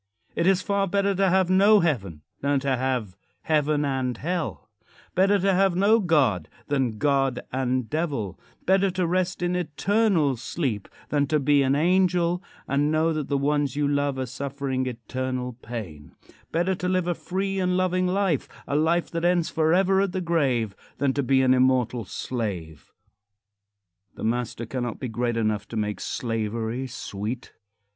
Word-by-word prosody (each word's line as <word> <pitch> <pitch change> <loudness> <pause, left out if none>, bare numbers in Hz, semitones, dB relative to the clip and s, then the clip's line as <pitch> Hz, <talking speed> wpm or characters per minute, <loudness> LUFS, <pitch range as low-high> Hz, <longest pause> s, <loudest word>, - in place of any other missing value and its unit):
It 170 - +1
is 190 -1 +3
far 200 -1 +1
better 200 +1 +1
to 195 0 +2
have 190 0 +3
no 200 +3 +6
heaven 100 - -1 0.2
than 140 0 +2
to 135 -1 +1
have 125 -7 -2 0.3
heaven 150 -1 +1
and 130 -3 -1
hell; 170 +2 -3 0.5
better 195 +2 +4
to 195 0 +2
have 190 -1 +3
no 205 +5 +4
God 135 - +2 0.2
than 130 -6 0
God 135 -1 +1
and 130 -2 -1
Devil; 140 - -2 0.3
better 190 +1 +3
to 185 -1 -1
rest 180 +1 0
iii 175 0 0
eternal 175 - +1
sleep 120 - -3 0.2
than 145 -1 +1
to 150 +1 +2
be 145 0 +3
an 135 0 +2
angel 175 +1 +2 0.3
and 145 +2 +1
know 160 +1 +2
that 155 -3 -3
the 140 - 0
ones 145 -1 0
you 145 0 +1
love 145 -1 0
are 130 - -1
suffering 135 0 -3
eternal 125 +1 -4
pain; 110 -11 -8 0.4
better 175 +3 +1
to 180 0 -2
live 185 -1 +1
a 175 - +2
free 195 +3 -3
and 180 -1 +1
loving 185 0 +1
life 185 -5 0 0.2
a 140 - -1
life 165 +3 +1
that 165 0 -3
ends 175 -1 +2
forever 180 +5 +3
at 195 -2 -1
the 190 - -1
grave 135 - 0 0.2
than 140 -1 +1
to 140 - 0
be 130 0 +3
an 130 0 +5
immortal 125 -3 +2
slave. 95 - -5 1.2
The - - -8
master 120 0 -1
cannot 120 0 -4
be 130 - -4
great 120 +1 -1
enough 110 -2 0
to 115 - -6
make 105 -1 -2
slavery 115 +2 -3
sweet. 115 +1 -6
145 Hz, 165 wpm, -25 LUFS, 125-180 Hz, 1.2 s, no